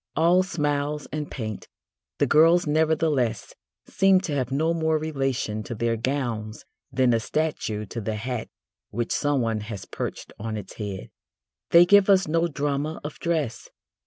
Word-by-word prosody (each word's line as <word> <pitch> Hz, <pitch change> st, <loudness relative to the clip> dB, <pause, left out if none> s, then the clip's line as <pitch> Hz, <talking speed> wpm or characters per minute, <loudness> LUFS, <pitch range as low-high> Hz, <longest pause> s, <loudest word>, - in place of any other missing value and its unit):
All 170 Hz, +4 st, +4 dB
smiles 150 Hz, -4 st, -2 dB
and 150 Hz, -1 st, -4 dB
paint, 110 Hz, -5 st, -6 dB, 0.5 s
the -, -, +3 dB
girls 165 Hz, +3 st, +5 dB
nevertheless 150 Hz, -8 st, +1 dB, 0.3 s
seem 195 Hz, -1 st, +4 dB
to 175 Hz, -6 st, -3 dB
have 130 Hz, -3 st, -1 dB
no 160 Hz, +5 st, +1 dB
more 160 Hz, -1 st, +1 dB
relation 135 Hz, -8 st, -2 dB
to 120 Hz, -, -5 dB
their 115 Hz, +1 st, 0 dB
gowns 115 Hz, -3 st, -3 dB, 0.3 s
than 130 Hz, -2 st, +3 dB
a 115 Hz, -, +3 dB
statue 110 Hz, -5 st, -2 dB
to 115 Hz, +4 st, -6 dB
the 110 Hz, +1 st, -3 dB
hat 115 Hz, +1 st, -4 dB, 0.4 s
which 115 Hz, +2 st, -3 dB
someone 125 Hz, -7 st, +1 dB
has 105 Hz, -3 st, -7 dB
perched -, -, -6 dB
on 110 Hz, +1 st, -4 dB
its 100 Hz, -3 st, -8 dB
head. 100 Hz, -, -6 dB, 0.6 s
They 170 Hz, +1 st, +8 dB
give 205 Hz, +2 st, +5 dB
us 195 Hz, -1 st, +5 dB
no 165 Hz, +2 st, +2 dB
drama 145 Hz, 0 st, -2 dB
of 150 Hz, 0 st, -7 dB
dress. 155 Hz, -10 st, -2 dB
140 Hz, 155 wpm, -25 LUFS, 115-160 Hz, 0.6 s, They